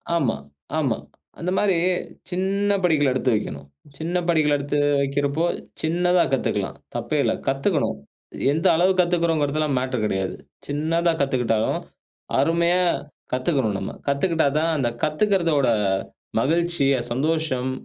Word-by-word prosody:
ஆமா, 135 Hz, -9 st, +1 dB, 0.4 s
ஆமா. -, -, +1 dB, 0.4 s
அந்த 180 Hz, +2 st, -2 dB
மாரி, 200 Hz, -3 st, +3 dB, 0.6 s
சின்ன 200 Hz, +2 st, 0 dB
படிகள் 150 Hz, -5 st, +3 dB
எடுத்து 130 Hz, 0 st, +1 dB
வைக்கணும். 70 Hz, -8 st, -4 dB, 0.3 s
சின்ன 170 Hz, +3 st, -2 dB
படிகள் 155 Hz, -3 st, +3 dB
எடுத்து 145 Hz, +1 st, -2 dB, 0.2 s
வைக்கிறப்போ, 140 Hz, +4 st, 0 dB, 0.4 s
சின்னதா 175 Hz, +2 st, +2 dB
கத்துக்கலாம். 130 Hz, -, -1 dB, 0.2 s
தப்பே -, -, -1 dB
இல்ல. -, -, +2 dB
கத்துக்கணும். 135 Hz, -, 0 dB, 0.6 s
எந்த 165 Hz, +5 st, +1 dB
அளவுக்கு 185 Hz, +2 st, +4 dB
கத்துக்கிறோம்ங்கிறதெல்லாம் 155 Hz, -4 st, +1 dB
மேட்டர் 130 Hz, -4 st, -2 dB
கெடையாது. 95 Hz, -2 st, -1 dB, 0.3 s
சின்னதா 165 Hz, +4 st, +1 dB
கத்துக்கிட்டாலும், 120 Hz, -5 st, +1 dB, 0.6 s
அருமையா 170 Hz, +5 st, +3 dB, 0.5 s
கத்துக்கணும் 130 Hz, -, 0 dB
நம்ம. -, -, -4 dB, 0.2 s
கத்துக்கிட்டா 160 Hz, +2 st, +2 dB
தான், 165 Hz, +1 st, +1 dB
அந்த 120 Hz, -4 st, 0 dB
கத்துக்கறதோட 160 Hz, -4 st, +2 dB, 0.7 s
மகிழ்ச்சி, 170 Hz, 0 st, +1 dB, 0.2 s
சந்தோஷம் 135 Hz, -1 st, 0 dB
155 Hz, 110 wpm, -23 LUFS, 135-170 Hz, 0.7 s, அளவுக்கு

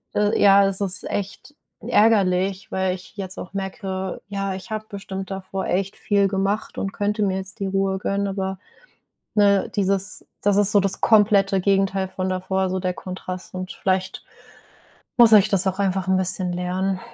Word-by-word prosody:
äh, 210 Hz, +1 st, +2 dB
ja, 200 Hz, 0 st, +7 dB
es 195 Hz, 0 st, -1 dB
ist 195 Hz, -1 st, -1 dB
echt 205 Hz, +8 st, -5 dB, 0.3 s
ärgerlich, 195 Hz, -3 st, +2 dB
weil 190 Hz, -1 st, 0 dB
ich 185 Hz, +2 st, -14 dB
jetzt 190 Hz, -2 st, -6 dB
auch 185 Hz, -, -8 dB
merke: 190 Hz, -1 st, -4 dB
„Ja, 195 Hz, -1 st, -3 dB
ich 190 Hz, +4 st, -10 dB
habe 215 Hz, 0 st, -3 dB
bestimmt 195 Hz, -1 st, -6 dB
davor 190 Hz, 0 st, -4 dB
echt 190 Hz, +2 st, -1 dB
viel 200 Hz, -1 st, +1 dB
gemacht 195 Hz, +2 st, -2 dB
und 195 Hz, -, -2 dB
könnte 210 Hz, +2 st, -2 dB
mir 190 Hz, -2 st, 0 dB
jetzt 190 Hz, +2 st, -7 dB
die 195 Hz, -, -2 dB
Ruhe 195 Hz, 0 st, 0 dB
gönnen.” 200 Hz, +1 st, -1 dB
Aber, 190 Hz, -1 st, -3 dB, 0.8 s
ne, 200 Hz, -2 st, +3 dB
dieses 195 Hz, -1 st, 0 dB, 0.2 s
das 205 Hz, -1 st, +3 dB
ist 205 Hz, -1 st, +4 dB
so 205 Hz, -, +5 dB
das 195 Hz, -1 st, 0 dB
komplette 200 Hz, -3 st, +4 dB
Gegenteil 195 Hz, 0 st, +1 dB
von 185 Hz, 0 st, -3 dB
davor, 190 Hz, 0 st, -1 dB
so 185 Hz, -, -1 dB
der 180 Hz, -1 st, -2 dB
Kontrast, 185 Hz, 0 st, -7 dB
und 185 Hz, +1 st, -5 dB
vielleicht 185 Hz, 0 st, -2 dB, 0.9 s
muss 235 Hz, -2 st, +7 dB
ich 210 Hz, -1 st, +7 dB
das 195 Hz, -2 st, +3 dB
auch 190 Hz, 0 st, -1 dB
einfach 190 Hz, -1 st, 0 dB
'n 190 Hz, -, +3 dB
bisschen 185 Hz, -1 st, 0 dB
lernen. 185 Hz, +2 st, -2 dB
195 Hz, 175 wpm, -22 LUFS, 185-200 Hz, 0.9 s, ja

